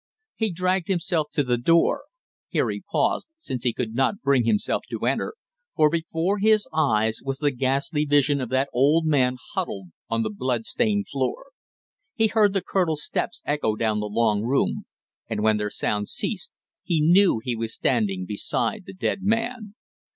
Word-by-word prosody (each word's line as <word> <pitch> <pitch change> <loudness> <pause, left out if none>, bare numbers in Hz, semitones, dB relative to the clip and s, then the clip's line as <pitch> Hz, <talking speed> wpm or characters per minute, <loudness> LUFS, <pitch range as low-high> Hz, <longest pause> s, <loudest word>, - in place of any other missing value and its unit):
He 220 -3 -1
dragged 185 0 0
himself 170 -4 0
to 145 - +2
the 125 -2 0
door. 165 +7 +3 0.4
Here - - +1
he - - -5
paused, - - +1
since 130 - -5
he 125 - +2
could 110 -1 -4
not 135 - +1
bring 140 -4 +3
himself 110 -2 +1
to - - -3
enter, - - -1 0.4
for 150 -1 +4
before 170 +4 -1
his 215 +1 +3
eyes 110 -8 +2
was 135 0 -3
the 145 0 +1
ghastly 135 +4 0
vision 145 -1 +3
of 125 - -4
that 130 +2 +1
old 145 +6 +3
man 130 -5 +2 0.2
huddled 100 - -3 0.2
on 115 0 0
the 110 - -2
blood 120 +1 -2
stained 210 -3 0
floor. 140 - -3 0.6
He 225 - +3
heard 210 -2 +3
the 195 - 0
colonel's 160 -6 0
steps - - -3
echo 145 -7 0
down 110 -1 0
the 105 - -2
long 105 -1 +1
room, 130 +5 0 0.4
and 105 - -2
when 110 -1 +4
their 105 0 -2
sound 105 0 -2
ceased 195 -3 -1 0.3
he 170 -4 0
knew 175 - +5
he 125 -2 -2
was 115 0 -3
standing 105 -8 0
beside 180 - -2
the - - -9
dead 185 - -1
man. 225 0 -1
145 Hz, 175 wpm, -24 LUFS, 115-185 Hz, 0.6 s, knew